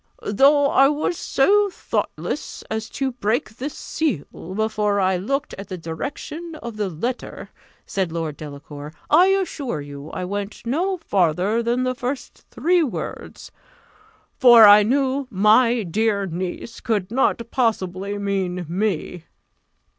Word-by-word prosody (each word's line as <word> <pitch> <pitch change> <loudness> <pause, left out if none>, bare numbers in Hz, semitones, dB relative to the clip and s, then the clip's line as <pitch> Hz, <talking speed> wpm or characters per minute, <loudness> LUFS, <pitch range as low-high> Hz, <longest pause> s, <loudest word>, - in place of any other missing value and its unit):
"Though 280 +6 +5
I 270 - +6
was 300 +4 0
so 405 +8 +3
thoughtless - - -4
as 220 0 -3
to 270 -1 -2
break 225 -1 -2
the 275 +4 -3
seal 285 - -2 0.3
before 210 -1 0
I 190 -1 +2
looked 275 +10 -2
at 195 - -7
the 185 - -5
direction 285 - -6
of 235 -7 -7
the 210 -2 -2
letter," 235 +10 -5 0.3
said 190 -4 -2
Lord 165 -3 -3
Delacour, 145 0 -9 0.2
"I 345 +5 +7
assure 345 - -1
you 145 +1 -9
I 180 - -4
went 200 +3 -5
no 355 +10 0
farther 195 - +1
than 240 +2 0
the 255 0 0
first 255 +1 -5
three 345 +7 +2
words; 290 -7 -5 0.9
for 240 -4 +9
I 205 0 +9
knew 265 +4 +1
'my 225 +3 +4
dear 200 +2 0
niece' 180 +5 -5
could 210 -4 -1
not 260 0 +2
possibly 200 -5 -1
mean 190 -3 -2
me." 180 -2 -2
220 Hz, 135 wpm, -22 LUFS, 185-270 Hz, 0.9 s, for